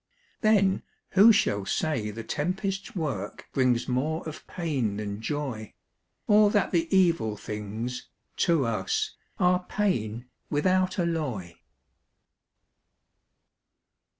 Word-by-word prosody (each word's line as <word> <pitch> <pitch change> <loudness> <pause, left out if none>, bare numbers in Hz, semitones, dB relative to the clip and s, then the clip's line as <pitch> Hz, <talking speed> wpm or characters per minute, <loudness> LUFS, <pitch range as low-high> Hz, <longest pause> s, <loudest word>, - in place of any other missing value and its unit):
Then 200 -3 +3 0.3
who 205 +4 +8
shall 100 - +2
say 115 -1 -1
the 110 +2 -6
tempest's 190 - -3
work 135 - -4
Brings 125 -2 +2
more 150 +6 -1
of 155 - -8
pain 135 - -2
than 105 0 -4
joy; 130 -5 -4 0.5
Or 210 0 +6
that 205 -1 +1
the 165 -2 +1
evil 165 - +2
things, 110 +5 -5 0.3
to 165 -6 +3
us 435 - -1 0.2
Are 180 -2 +3
pain, 120 - -1 0.2
without 185 +4 +1
alloy? 150 - -2
150 Hz, 100 wpm, -27 LUFS, 110-185 Hz, 0.5 s, who